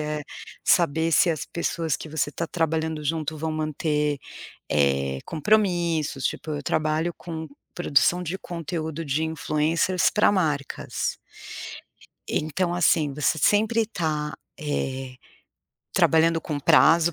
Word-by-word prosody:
é 150 0 -3 0.4
saber 165 -1 +3
se 170 - +5
as 155 - -2
pessoas 165 -2 -1
que - - -9
você 150 -1 -1
está 170 - -3
trabalhando 160 -2 -1
junto 155 0 -2
vão 160 +1 -2
manter, 150 -1 -1 0.5
eh, 70 -2 +1
compromissos, 170 -6 +1
tipo, 155 - -2
eu 145 -1 -3
trabalho 155 +3 0
com 160 -2 -6 0.3
produção 175 +1 +2
de 180 +1 -3
conteúdo 165 -3 -5
de 145 +3 0
influencers 160 +3 +1
pra 210 - +4
marcas 150 -8 -1 1.1
então 170 +3 -1
assim, 155 -4 +3
você 150 +2 +1
sempre 220 +6 +3
tá, 150 -7 -2 0.2
eh, 135 -3 -3 0.8
trabalhando 165 0 +4
com 150 -3 -4
prazo, 165 +2 +5
160 Hz, 120 wpm, -25 LUFS, 150-170 Hz, 1.1 s, se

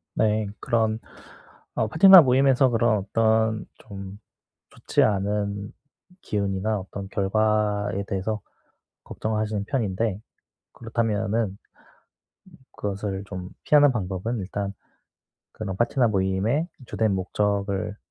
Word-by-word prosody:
네 110 -1 +1
그런 110 -1 0 0.8
어 - - +1
파티나 190 +2 +9
모임에서 130 0 +4
그런 115 -2 +2
어떤 110 +1 +1
좀 100 0 -10 0.5
좋지 - - 0
않은 100 0 -1 0.5
기운이나 100 +1 -1
어떤 100 +1 -7
결과에 105 0 0
대해서 100 +2 -2 0.6
걱정하시는 110 -2 -3
편인데 110 -5 -1 0.5
그렇다면은 115 -1 -1
음 100 - -14 1.2
그것을 100 -1 -4
좀 90 -2 -7
피하는 145 -2 +5
방법은 100 +2 -3
일단 100 +1 -4 0.8
그런 95 -3 -5
파티나 120 +2 +2
모임의 100 - 0 0.2
주된 110 -3 0
목적을 100 +1 -1
105 Hz, 235 characters per minute, -25 LUFS, 100-115 Hz, 1.2 s, 파티나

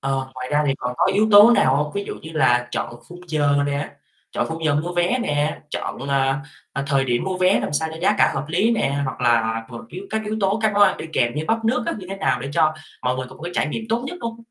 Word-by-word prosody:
Ờ, 135 -1 -2
ngoài 130 0 -6
ra 150 0 +3
thì 135 - +2
còn 125 0 -3
có - - +3
yếu 215 +2 +3
tố 205 +2 +9
nào 135 - +4
hông? 150 +1 -1
Ví 200 0 -2
dụ - - -5
như 160 - -8
là 125 -6 +2
chọn 120 - -4
khung 175 0 -11
giờ 145 -2 +2
nè, 145 0 -2 0.4
chọn - - -1
khung 160 0 -5
giờ 150 -2 +2
mua 170 +4 -1
vé 175 +8 +1
nè, 150 -4 -1
chọn, - - -4
ờ, 135 -1 +2 0.4
ờ, 140 - -2
thời 140 -1 +2
điểm 120 -2 0
mua 190 -1 -2
vé 185 +1 +3
làm - - -3
sao 160 +2 0
cho 160 - -8
giá 180 - +3
cả - - +4
hợp 135 - -2
lý 190 +8 +2
nè, 140 -11 0
hoặc 130 -1 -5
là 115 -2 +2
một 120 -2 -9
yếu 185 +3 -8
các 220 0 -1
yếu 215 +1 -3
tố 195 +2 +1
các 215 -1 +2
món 205 0 +4
ăn - - +5
đi - - -6
kèm 120 -5 +1
như 150 +1 -2
bắp 225 0 0
nước 245 +2 +1
á - - 0
như 185 - -9
thế 195 - -4
nào 195 - 0
để 135 - -5
cho 155 -1 +3 0.3
mọi 125 0 0
người 130 0 -4
có - - -13
một - - -15
cái 175 +1 -5
trải - - +1
nghiệm 225 +9 -4
tốt 230 +2 0
nhất 355 - -6
hông? 230 -1 -4
155 Hz, 290 wpm, -22 LUFS, 135-195 Hz, 0.4 s, tố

